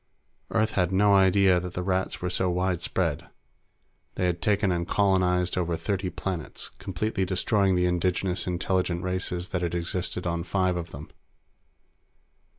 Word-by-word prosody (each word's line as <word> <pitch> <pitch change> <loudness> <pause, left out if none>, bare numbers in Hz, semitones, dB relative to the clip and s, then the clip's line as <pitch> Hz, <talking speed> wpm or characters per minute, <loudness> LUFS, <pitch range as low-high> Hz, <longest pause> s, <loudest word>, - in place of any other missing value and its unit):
Earth 110 -1 +1
had 90 -2 +1
no 100 +2 +4
idea 95 -1 +5
that 90 0 -7
the 90 - -2
Rats 95 -1 -1
were 90 - 0
so 90 +1 +1
widespread. 90 -1 -1 0.9
They 90 - 0
had 85 -1 -1
taken 100 0 +2
and 85 -1 -1
colonized 90 -3 +2
over 85 -2 -1
thirty 95 +2 -2
planets, 90 -4 -5
completely 95 +2 -2
destroying 95 +1 +2
the 90 0 +2
indigenous 90 +1 0
intelligent 90 0 0
races 90 -1 -2
that 90 - -2
had 85 0 -1
existed 90 +1 -2
on 85 -1 -1
five 95 -1 0
of 85 -1 -4
them. 75 +3 -10
90 Hz, 150 wpm, -27 LUFS, 90-95 Hz, 0.9 s, idea